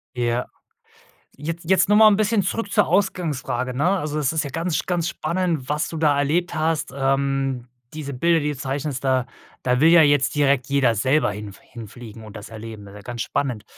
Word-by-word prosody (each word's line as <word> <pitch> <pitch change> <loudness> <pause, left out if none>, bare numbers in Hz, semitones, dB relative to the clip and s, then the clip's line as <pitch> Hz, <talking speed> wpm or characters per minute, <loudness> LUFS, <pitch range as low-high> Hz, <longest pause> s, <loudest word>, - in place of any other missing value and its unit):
Ja. 120 0 -1 0.9
Jetzt 165 +3 -5
jetzt 190 - +4
noch 210 - +5
mal 220 +1 +8
ein 205 -2 +5
bisschen 215 -1 +2
zurück 200 +2 -3
zur - - +3
Ausgangsfrage, 165 -9 -1
ne? 145 +8 +1
Also, 155 -3 -3
es 140 -3 +1
ist 160 0 0
ja 140 - -5
ganz 165 +3 -1
ganz 175 -2 -1
spannend, 170 -6 -2
was 150 +2 0
du 165 - -6
da 150 -2 +3
erlebt 160 +6 0
hast. 160 -3 -1
Ähm, 135 -2 0 0.3
diese 150 -2 -6
Bilder, 165 +6 +2
die 150 0 -1
du 145 - -7
zeichnest, 140 0 -3
da 130 -2 +1 0.4
da 125 0 +1
will 160 - +7
ja 170 0 +7
jetzt 145 -2 +3
direkt 140 -3 +2
jeder 140 -4 +2
selber 125 +2 +2
hinf 100 -1 -8
hinfliegen 115 0 -11
und 105 - -12
das 105 +1 -10
erleben, 110 -2 -9
ist 100 - -13
ja - - -10
ganz 120 +2 -6
spannend. 125 -7 -2
140 Hz, 200 wpm, -22 LUFS, 125-165 Hz, 0.9 s, mal